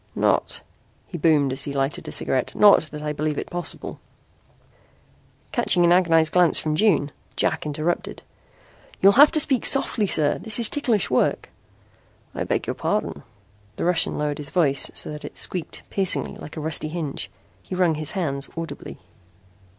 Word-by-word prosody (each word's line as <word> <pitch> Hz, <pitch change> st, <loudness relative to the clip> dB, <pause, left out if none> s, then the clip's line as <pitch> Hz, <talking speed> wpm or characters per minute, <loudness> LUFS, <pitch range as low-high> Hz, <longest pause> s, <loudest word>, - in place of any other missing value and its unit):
"Not," -, -, 0 dB, 0.4 s
he 175 Hz, -, -8 dB
boomed 145 Hz, -4 st, +2 dB
as 135 Hz, -, -2 dB
he 140 Hz, -, -5 dB
lighted 135 Hz, +1 st, -2 dB
a -, -, -5 dB
cigarette, 130 Hz, -2 st, -1 dB
"not 205 Hz, -1 st, +6 dB
that 150 Hz, 0 st, -7 dB
I 150 Hz, 0 st, -2 dB
believe 150 Hz, 0 st, -2 dB
it -, -, -5 dB
possible 175 Hz, -1 st, -4 dB, 0.8 s
" -, -, -35 dB
Catching 190 Hz, -8 st, +2 dB
an 170 Hz, -, +4 dB
agonized 165 Hz, -3 st, +3 dB
glance 180 Hz, -2 st, +4 dB
from 155 Hz, -1 st, 0 dB
Jane, 155 Hz, -7 st, +2 dB, 0.2 s
Jack -, -, -1 dB
interrupted: 155 Hz, +4 st, -3 dB, 0.8 s
"You'll 195 Hz, -, +6 dB
have 285 Hz, +7 st, +7 dB
to 310 Hz, -, +4 dB
speak 270 Hz, -4 st, +3 dB
softly, 230 Hz, -6 st, +3 dB
sir. 150 Hz, -5 st, +2 dB
This 220 Hz, -2 st, -2 dB
is 235 Hz, -2 st, +3 dB
ticklish 240 Hz, -, 0 dB
work." 125 Hz, -, 0 dB, 0.8 s
"I -, -, -3 dB
beg -, -, -1 dB
your -, -, -2 dB
pardon." -, -, -3 dB, 0.5 s
The -, -, -3 dB
Russian 175 Hz, -1 st, +1 dB
lowered 150 Hz, 0 st, -2 dB
his 145 Hz, -, -4 dB
voice 145 Hz, -6 st, +1 dB
so -, -, -3 dB
that 150 Hz, 0 st, -8 dB
it -, -, -9 dB
squeaked 180 Hz, -3 st, -4 dB
piercingly 195 Hz, -2 st, -1 dB
like 150 Hz, -, -11 dB
a -, -, -4 dB
rusty 155 Hz, 0 st, -1 dB
hinge. 155 Hz, -3 st, -5 dB, 0.3 s
He 185 Hz, -, -7 dB
wrung 180 Hz, -3 st, +2 dB
his 155 Hz, 0 st, -1 dB
hands 140 Hz, -8 st, -3 dB
audibly. 165 Hz, 0 st, -7 dB
165 Hz, 170 wpm, -23 LUFS, 150-185 Hz, 0.8 s, have